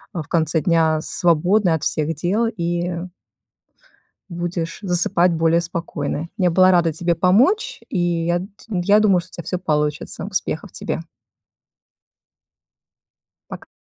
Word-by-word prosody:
в 165 - -2
конце 160 -1 +1
дня 165 -3 +2
свободной 175 +3 +2
от 160 - -5
всех 155 +1 -1
дел 190 +9 0
и 175 -4 -2 1.4
будешь 170 -1 -4
засыпать 180 -1 +2
более 165 +1 +2
спокойной. 165 -2 -4
Я 180 -3 +2
была 185 +2 +5
рада 170 -3 +3
тебе 170 +2 0
помочь, 250 - +2
и - - -3 0.3
я 175 0 +2
ть 195 +3 -11
я 200 +1 +3
думаю, 195 -4 +3
что 170 - -17
у - - -33
тебя 170 - -8
всё 180 - -3
получится. 150 -2 -2
Успехов 190 -2 -3
тебе. - - -4 2.5
Пока! - - -9
175 Hz, 130 wpm, -21 LUFS, 165-185 Hz, 2.5 s, была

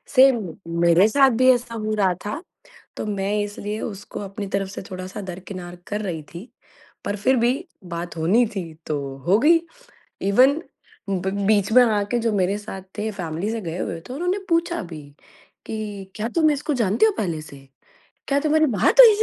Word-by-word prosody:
Same 240 -10 +5 0.3
मेरे 170 +4 +6
साथ 270 +4 +5
भी 255 - +6
ऐसा 245 -1 -1
हो 215 -1 -2
रहा 190 -3 +2
था, 280 +10 -3 0.6
तो - - -3
मैं 200 -1 -1
इसलिए 205 +1 -5
उसको 200 -3 -6
अपनी 200 0 -5
तरफ 195 -1 -1
से 195 - -7
थोड़ा-सा 185 +2 -6
दरकिनार 180 -1 -7
कर 210 +1 -2
रही 175 -6 -3
थी। 185 +9 -9 0.6
पर 205 - -1
फिर 260 +6 +3
भी 240 +2 +3 0.4
बात 170 0 -5
होनी 200 +10 +3
थी 190 - -2 0.2
तो 150 - -1 0.3
हो 195 +4 +5
गई, 330 +6 +5 0.6
इवन 255 +10 +4 0.5
ब 190 0 -1 0.2
बीच 205 -1 +3
में 250 - +8
आके 215 0 +1
जो 230 - +3
मेरे 195 0 +1
साथ 205 -2 -7 0.2
थे 215 +1 -1
फ़ैमिली 175 0 -3
से 230 - -3
गए 170 -2 -5
हुए 170 -2 -3
थे, 250 - -9
उन्होंने 355 +7 -1
पूछा 340 +1 +1
भी 155 -2 -7 0.6
कि 205 -3 -6
क्या 215 +1 -2
तुम 315 -2 +4
इसको 295 +1 -1
जानते 225 - +3
हो 440 - +4
पहले 170 -6 -2
से? 145 -2 -11 0.7
क्या 280 0 +2
तुम्हारी 310 +1 +3
बात - - +3
हुई 470 - +10
इस 415 - -1
205 Hz, 185 wpm, -23 LUFS, 190-250 Hz, 0.7 s, हुई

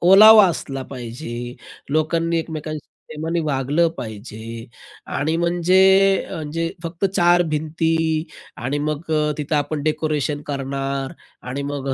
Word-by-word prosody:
ओलावा 210 +3 +9
असला 135 -5 -4
पाहिजे. 120 -1 -6 0.4
लोकांनी, 165 +2 +1
एकमेकांशी 155 -2 -5 0.2
प्रेमाने 160 +2 -2
वागलं 150 +2 +1
पाहिजे 110 +1 -7 0.5
आणि 155 +3 0
म्हणजे 175 +1 +2 0.5
अ, 160 - -5
जे 165 +1 -1
फक्त 170 +2 -4
चार 175 -1 +5
भिंती 160 +1 0 0.3
आणि 135 +5 -2
मग 150 +2 -3
अ, 150 -1 +2
तिथं 150 +1 -2
आपण 145 0 -1
डेकोरेशन 155 -1 -1
करणार 135 -1 -3 0.4
आणि 135 +3 -3
मग 140 -1 -4
155 Hz, 120 wpm, -21 LUFS, 135-165 Hz, 0.5 s, ओलावा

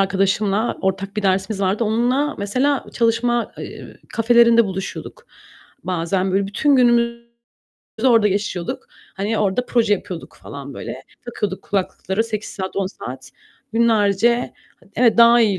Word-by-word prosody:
arkadaşımla 195 +3 +1
ortak 195 +2 -2
bir 210 - -1
dersimiz 195 +1 0
vardı. 200 +4 +1
Onunla, 245 +7 +1
mesela, 255 +8 0
çalışma, 235 0 +1
eee, - - -9 0.2
kafelerinde 235 0 +5
buluşuyorduk. 195 - -6 0.6
Bazen 185 +1 -1
böyle 195 +1 +1
bütün 275 +8 +2
günümüzü 235 -1 +3 0.8
orada 230 -4 +5
geçiyorduk. 195 -3 -3 0.3
Hani, 210 +3 -1
orada 210 +5 0
proje 230 -4 +2
yapıyorduk 185 -4 -4
falan 140 -1 -8
böyle. - - -7 0.2
Takıyorduk 210 -5 -4
kulaklıkları 195 +1 -2
8 215 -2 -4
saat, 190 0 -6
10 195 - 0
saat 130 -8 -9 0.4
günlerce 225 +1 +2 0.4
Evet, 235 -1 +3
daha 235 +1 +7
iyi 205 -5 +2
210 Hz, 125 wpm, -20 LUFS, 195-235 Hz, 0.8 s, daha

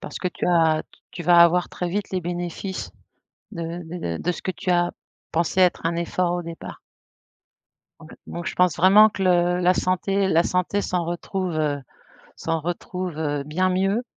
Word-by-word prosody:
parce - - -7
que 180 - -1
tu - - -5
as 165 -3 +3 0.3
tu 175 - -6
vas 175 +1 +5
avoir 170 +1 +5
très 180 - -4
vite 200 +3 -3
les 185 -1 -1
bénéfices 175 +2 -4 0.6
de 170 -1 -5
de 160 - -4
de 180 - 0
ce - - -9
que 185 - -2
tu 185 - -3
as 175 0 +2 0.4
pensé 170 +3 +1
être 180 -2 +3
un 170 0 -1
effort 175 +1 0
au 175 - -2
départ. 165 0 -9 1.2
Donc - - -13 0.2
donc 170 0 -6
je - - -3
pense 180 -3 +3
vraiment 195 +5 +7
que 200 -2 -5
le 180 -1 +3
la 180 +1 +4
santé 190 +2 0
la 165 -2 +4
santé 180 +3 0
s'en 180 -2 -1
retrouve, 175 +2 -3
heu, 145 -2 0 0.6
s'en 165 0 -2
retrouve, 175 +1 -4
heu, 145 -2 -1
bien 185 +6 0
mieux, 195 +5 +1
175 Hz, 180 wpm, -23 LUFS, 170-185 Hz, 1.2 s, vraiment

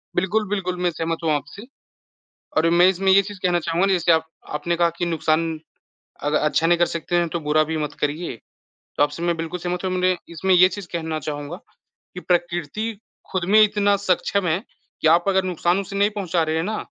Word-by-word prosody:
बिल्कुल, 205 +3 0
बिल्कुल, 185 -3 -2
मैं 175 - +2
सहमत 165 0 -2
हूँ 160 - +1
आपसे। 150 - -4 0.9
और 165 +1 +4
मैं 175 +1 +5
इसमें 190 +1 +1
ये 200 - +7
चीज़ 200 0 -9
कहना 175 -1 +2
चाहूँगा 170 +3 0
ना 195 - +2
जैसे 175 -2 +3
आप 160 0 +2 0.3
आपने 170 +3 -1
कहा 170 0 +3
कि 175 - 0
नुकसान 165 -1 +1 0.8
अग 150 +1 0
अच्छा 150 +2 +2
नहीं 170 0 +3
कर 175 - +4
सकते 170 +1 -2
हैं 170 -1 +2
तो 170 +1 -3
बुरा 150 +1 +2
भी 160 +1 -3
मत 150 -1 -3
करिए। 150 -1 -2 0.6
तो - - +3
आपसे 145 +3 -1
मैं 175 -1 +1
बिल्कुल 165 +2 -5
सहमत 180 +1 -3
हूँ, 185 - 0
माने 185 0 +2
इसमें 180 +3 +1
ये 180 +1 +7
चीज़ 195 -1 -7
कहना 160 -2 -3
चाहूँगा 145 +3 -5 0.6
कि 180 - -6
प्रकृति 175 +5 -1 0.3
खुद 185 -2 -1
में 215 - +8
इतना 205 -1 +3
सक्षम 195 0 0
है 170 +5 0 0.4
कि 160 - +3
आप 170 +2 +5
अगर 190 -1 +2
नुकसान 175 0 0
उसे 200 0 -6
नहीं 205 +1 +3
पहुँचा 185 -5 -1
रहे 160 0 -1
हैं 160 - 0
ना, 215 +4 -2
175 Hz, 215 wpm, -22 LUFS, 160-190 Hz, 0.9 s, में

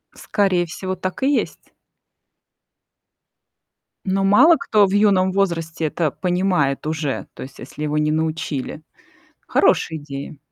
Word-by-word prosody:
Скорее 185 -4 0
всего, 185 +2 -5
так 185 +6 -5
и 285 +2 +3
есть. - - -3 2.3
Но 195 +1 0
мало 260 +13 +6
кто 210 -2 +3
в - - -4
юном 195 -3 +3
возрасте 165 -4 -1
это 155 0 0
понимает 180 -6 0
уже. 155 -4 -3
То - - -7
есть 135 +1 -12
если 145 +4 -8
его 150 0 -1
не 150 0 +1
научили. 155 -2 -3 0.7
Хорошая 160 - +2
идея. 140 0 -8
170 Hz, 125 wpm, -21 LUFS, 150-195 Hz, 2.3 s, мало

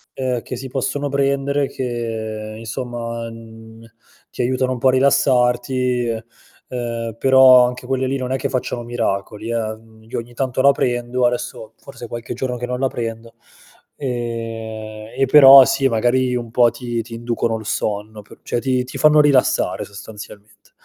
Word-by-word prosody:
ehm, 125 -3 -2
che 125 - -6
si 130 +2 -7
possono 135 +2 -2
prendere, 140 0 0
che 110 -3 -5
insomma, 115 0 -5
mhmm, 115 0 -13 0.5
ti - - -4
aiutano 130 +1 0
un 130 - -4
po' 130 - +3
a - - +6
rilassarti 125 -2 +2
e 115 -1 -3 0.4
ehm, 115 -2 -4
però 130 -1 +7
anche 125 0 -6
quelle 130 0 -1
lì 135 +1 -1
non 130 -1 -3
è 130 - +1
che - - -2
facciano 125 -1 -3
miracoli, 110 -2 -3
eh, 110 -2 -2 0.3
io - - -4
ogni 120 +1 -8
tanto 130 0 -1
la 140 +1 +6
prendo 120 -1 0
adesso 120 -2 -4
forse 135 -3 -10
qualche 120 +1 -6
giorno 125 0 -3
che 125 0 -4
non 125 0 -4
la 135 - +2
prendo, 115 -1 -6 0.6
ehm, 115 -3 -5
e 135 - +3
però 135 -2 +10
sì 135 +1 +1
magari 125 +2 +1
un 120 -2 -4
po' 120 0 +4
ti 120 -1 -4
ti 115 +1 -10
inducono 115 -1 -2
il 110 - -10
sonno 105 -1 -3
p 105 - -16
cioè, 120 - -2
ti 130 0 0
ti 130 - -8
fanno 150 0 +5
rilassare 140 -3 +2
sostanzialmente. 105 0 -12
120 Hz, 165 wpm, -20 LUFS, 115-130 Hz, 0.6 s, però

